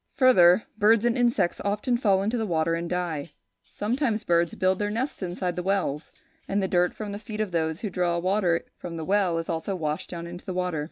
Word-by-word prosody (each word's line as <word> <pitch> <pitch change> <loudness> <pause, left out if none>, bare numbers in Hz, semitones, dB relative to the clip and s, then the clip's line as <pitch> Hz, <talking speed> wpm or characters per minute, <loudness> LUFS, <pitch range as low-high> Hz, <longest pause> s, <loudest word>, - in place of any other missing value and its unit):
Further, 220 -8 +6 0.2
birds 220 +2 +4
and 240 0 +2
insects 240 -8 +1
often 210 +5 0
fall 200 -5 +2
into 220 +4 0
the 225 -2 -1
water 165 -2 +1
and 170 0 -2
die; 170 -4 -3 0.3
sometimes 225 0 -1
birds 170 -3 +1
build 185 0 +1
their 205 0 0
nests 235 +6 -3
inside 180 -1 -3
the 180 - -2
wells; 180 -6 -1 0.4
and 195 - -1
the 190 - 0
dirt 180 -1 +1
from 210 -2 -5
the 200 - -5
feet 215 0 -7
of 215 -3 -1
those 160 +1 -1
who 210 - -3
draw 175 -1 0
water 180 -1 +1
from 170 -2 -6
the 160 - -4
well 190 -3 +2
is 165 - -3
also 165 +4 -2
washed 155 -3 -3
down 170 -1 -6
into 175 +1 -8
the 185 - -5
water. 180 -3 -1
185 Hz, 220 wpm, -26 LUFS, 170-210 Hz, 0.4 s, Further